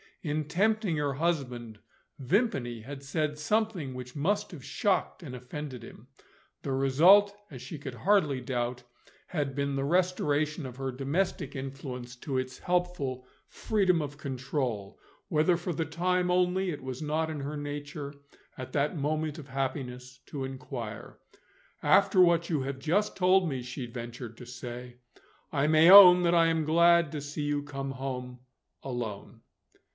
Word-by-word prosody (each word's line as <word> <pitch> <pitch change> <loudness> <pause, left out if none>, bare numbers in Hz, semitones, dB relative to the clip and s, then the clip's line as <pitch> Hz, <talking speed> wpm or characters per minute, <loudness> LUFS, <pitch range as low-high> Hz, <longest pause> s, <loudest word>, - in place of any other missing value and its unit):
In 150 -2 -2
tempting 200 +1 +1
her 145 -2 0
husband, 125 -8 -2 0.4
Vimpany 135 - 0
had 135 +4 -9
said 150 +1 -2
something 185 -4 -1
which 125 0 -8
must 205 +9 0
have 155 -8 -10
shocked 195 +1 -1
and 130 -5 -7
offended 125 0 -7
him. 115 +1 -13 0.6
The 140 - -3
result, 175 +10 +5 0.2
as - - -9
she 165 - -7
could 135 -3 -7
hardly 155 - +2
doubt, 125 -1 -3 0.4
had 145 -5 -2
been 140 0 -1
the 135 - -1
restoration 155 -2 +1
of 125 -1 -8
her 135 -1 -3
domestic 140 +8 -2
influence 130 -2 -6
to 135 +1 -3
its 130 0 -4
helpful 175 -8 -1 0.2
freedom 185 -6 +1
of 145 -1 -6
control 130 -6 -3 0.3
whether 165 +2 +3
for 175 +1 -3
the 160 +1 -1
time 180 +3 0
only 180 +1 +2
it 145 - -7
was 130 0 -5
not 155 +1 -1
in 155 -2 -4
her 145 +2 -4
nature, 145 0 -6 0.4
at 130 -1 -7
that 150 +4 0
moment 155 +1 -1
of 145 -3 -10
happiness, 130 -2 -4
to 140 -3 -5
inquire. 125 -4 -7 0.6
"After 195 -1 +5
what 170 -1 +4
you 155 -5 0
have 135 0 -4
just 185 +9 0
told 185 0 +4
me," 135 -4 -3
she 125 +1 -6
ventured 120 0 -7
to 125 - -10
say, 120 0 -8 0.5
"I 140 -1 +1
may 155 +2 +6
own 180 -3 +11
that 175 0 +3
I 165 -1 +5
am 165 -1 +1
glad 170 0 +4
to 150 - -4
see 145 +1 -5
you 145 0 0
come 135 -1 -5
home, 125 -2 -5 0.4
alone." 120 -6 -5
145 Hz, 155 wpm, -29 LUFS, 130-170 Hz, 0.6 s, own